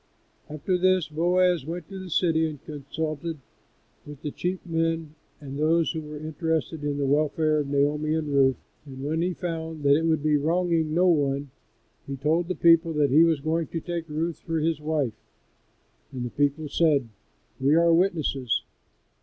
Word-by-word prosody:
After 165 +5 -1
this 185 -2 +3
Boaz 175 +1 +2
went 165 +2 -6
to 195 -1 -7
the 185 -1 -8
city 160 -1 +2
and 150 -3 -11
consulted 155 +2 -4 0.7
with 145 -1 -11
the 150 - -3
chief 180 +4 -3
men 165 -2 -1 0.3
and 140 -1 -7
those 165 +2 +2
that 160 - -3
were 150 0 -8
interested 160 0 -2
in 145 -1 -1
the 140 - 0
welfare 155 +2 +2
of 145 - -2
Naomi 145 +2 +1
and 155 -2 -2
Ruth, 135 -2 +4 0.3
and 135 -1 -8
when 160 +3 -1
he 180 0 -1
found 160 -3 -5
that 140 0 +5
it 160 +2 +1
would 160 -3 +1
be 150 -1 +3
wronging 165 0 +1
no 180 +2 +4
one, 140 -5 +1 0.6
he 140 - -4
told 160 +5 +1
the 185 - -2
people 165 0 +4
that 145 -3 +2
he 155 +4 +7
was 165 -4 +2
going 160 +1 -1
to 165 - -4
take 170 -1 -5
Ruth 160 +2 -2
for 165 -1 -3
his 160 -1 0
wife, 150 -6 -1 1.0
and 125 -2 -4
the 120 - -5
people 145 +2 0
said, 145 -4 +2 0.5
"We 140 +3 +3
are 170 0 +5
witnesses." 160 -9 +1
155 Hz, 180 wpm, -26 LUFS, 145-165 Hz, 1.0 s, he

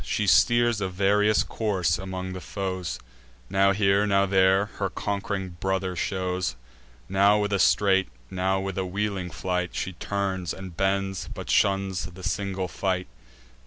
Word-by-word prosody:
She 105 - -1
steers 120 +1 +4
a 95 - -1
various 105 +3 +3
course 95 -7 0
among 95 0 -5
the 95 - -6
foes; 95 -3 -4 0.5
Now 100 0 +4
here, 100 +1 +3
now 100 -1 +3
there, 95 0 +4
her 100 -1 0
conqu'ring 95 -3 -3
brother 95 -1 -1
shows; 90 -6 -2 0.5
Now 100 +2 +4
with 105 -1 0
a 100 - +2
straight, 95 -4 +3 0.2
now 95 +1 0
with 95 0 -3
a - - 0
wheeling 100 -1 -2
flight, 90 +2 -2
She 95 - -3
turns, 95 -1 -2
and 95 -3 -9
bends, 95 +1 -1
but - - -5
shuns 95 -2 +2
the 90 +1 -10
single 95 -1 -2
fight. 90 -1 -2
95 Hz, 150 wpm, -26 LUFS, 95-100 Hz, 0.5 s, steers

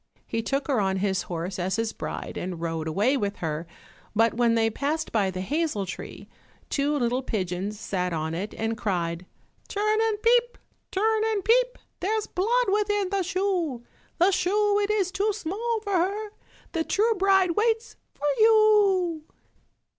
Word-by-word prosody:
He 225 - -2
took 275 +5 -2
her 265 -7 +2
on 190 -1 0
his 190 -1 0
horse 175 +2 -4
as 185 +2 0
his 225 0 -1
bride, - - -6
and 180 -2 -4
rode 165 -1 -3
away 205 - +2
with 205 -6 -1
her, 160 0 -4 0.5
but 225 +1 +4
when 235 0 +2
they 225 0 +2
passed 300 +6 -2
by 205 -4 +2
the 185 0 -4
hazel 290 - -1
tree, 185 - -8 0.4
two 290 +1 +1
little 245 0 0
pigeons 200 -3 -3
sat 180 -2 -2
on 160 -1 -2
it 195 +5 -4
and 225 0 -1
cried, 175 -3 -2 0.4
"Turn 425 +1 +1
and 440 -2 +1
peep, 480 +1 +3 0.3
turn 435 +3 +1
and 430 -4 -1
peep, - - +3 0.2
There's 425 +3 0
blood 470 +7 +1
within 415 -2 +1
the 395 -1 +1
shoe 365 -9 -1 0.3
The 365 +3 +4
shoe 405 +3 +2
it 405 - -1
is 400 -4 +1
too 405 +2 0
small 430 +5 -2
for 405 -2 -3
her, 400 +4 0 0.4
The 330 -2 0
true 440 +7 +2
bride 385 -2 +3
waits 450 +5 0 0.2
for 290 - -5
you." 415 -6 +4
325 Hz, 165 wpm, -26 LUFS, -, 0.5 s, but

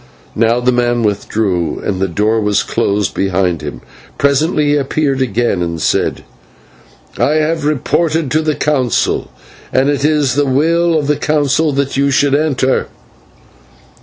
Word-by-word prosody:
Now 115 +2 +2
the 125 +1 +1
man 120 -1 +1
withdrew, 100 -5 -1
and 95 -2 -2
the 95 - +1
door 105 +5 0
was 105 -1 +1
closed 100 0 -1
behind 90 -4 0
him. 70 -6 -7 0.4
Presently 145 +2 +1
he 145 - +3
appeared 140 -1 0
again 115 -5 0
and 85 -1 -3
said: - - 0 1.0
"I 150 - +2
have 155 0 0
reported 155 +1 0
to 155 - +2
the 155 -1 -1
Council, 130 -7 0 0.4
and 135 +2 +2
it 140 -1 -2
is 150 -3 +2
the 145 +1 +1
will 165 +5 +2
of 150 - -1
the 150 0 +1
Council 150 +1 +1
that 140 0 -1
you 140 0 +2
should 140 0 +2
enter." 140 -3 +1
135 Hz, 150 wpm, -15 LUFS, 105-150 Hz, 1.0 s, he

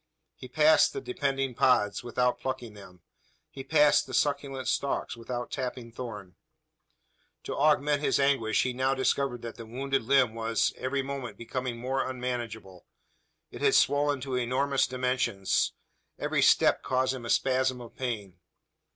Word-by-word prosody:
He 130 - -11
passed 155 +5 +4
the 410 - -3
depending 135 - -2
pods, 115 -4 +2
without 125 +1 0
plucking 130 -4 -4
them. 90 -4 -14 0.5
He 135 - -8
passed 150 0 +4
the 130 - -4
succulent 135 -3 -1
stalks, 140 +2 -1
without 120 +1 -5
tapping 125 -2 -5
thorn. 105 -7 -8 1.1
To - - -4
augment 145 0 +2
his 150 - +1
anguish, 135 -6 +2
he 130 - -2
now 130 +2 +1
discovered 130 -2 0
that 115 - -7
the 115 - -8
wounded 135 +4 -1
limb 125 -1 +3
was, 115 0 0
every 135 +1 -2
moment, 135 -6 -6
becoming 125 +1 -4
more 130 +2 -2
unmanageable. 120 -7 -5 0.6
It - - -9
had - - +4
swollen 145 -1 +3
to 135 0 -5
enormous 130 +3 +1
dimensions. 125 -6 0 0.5
Every - - 0
step - - +4
caused 130 0 0
him 130 -2 -7
a 115 - -6
spasm 130 0 +1
of 120 -1 -11
pain. 105 -8 -5
130 Hz, 150 wpm, -28 LUFS, 115-135 Hz, 1.1 s, passed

